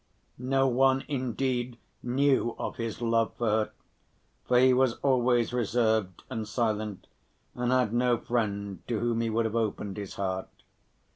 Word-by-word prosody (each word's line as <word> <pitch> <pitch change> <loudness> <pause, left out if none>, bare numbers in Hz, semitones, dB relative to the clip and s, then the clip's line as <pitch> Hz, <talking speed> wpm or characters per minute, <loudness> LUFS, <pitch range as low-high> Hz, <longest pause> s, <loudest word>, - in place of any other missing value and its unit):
No 135 +2 +2
one 130 +1 +3
indeed 125 -2 -2 0.2
knew 130 -1 +1
of - - -4
his 115 0 -4
love 115 -1 +1
for 120 - -1
her, 110 0 +1 0.7
for 125 - +3
he 130 +1 +6
was 130 -2 +3
always 125 -3 +2
reserved 110 -5 0
and 110 -1 -4
silent 110 -3 -2 0.5
and 125 0 -1
had 125 -4 +2
no 120 0 +2
friend 100 -5 -2
to 115 -3 -1
whom 115 0 0
he 115 - 0
would 115 +1 +1
have 110 0 -2
opened 105 -3 -2
his 100 -2 -6
heart. 95 -1 -3
120 Hz, 150 wpm, -28 LUFS, 110-125 Hz, 0.7 s, he